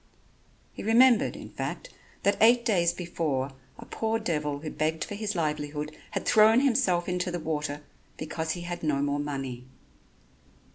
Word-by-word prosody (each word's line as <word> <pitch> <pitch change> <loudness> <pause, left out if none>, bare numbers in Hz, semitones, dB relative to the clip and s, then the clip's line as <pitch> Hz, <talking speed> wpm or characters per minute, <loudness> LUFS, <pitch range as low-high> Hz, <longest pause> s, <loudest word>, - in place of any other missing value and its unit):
He - - -8
remembered, 235 +2 +4
in - - -9
fact, - - -5 0.3
that 200 - +3
eight 235 +2 +6
days 175 -7 +3
before 155 -7 -2 0.3
a - - -10
poor 225 0 -1
devil 150 -7 -2
who 155 - -5
begged 155 +1 -1
for - - -6
his 210 0 -3
livelihood, 150 -1 -2
had - - -4
thrown 220 +3 +6
himself 185 -10 +2
into 180 0 -1
the 175 0 -3
water 150 -2 -3 0.3
because 160 +1 -3
he 175 - -6
had 175 0 -5
no 145 -3 0
more 145 0 0
money. 135 -4 -4
165 Hz, 155 wpm, -28 LUFS, 150-205 Hz, 0.3 s, eight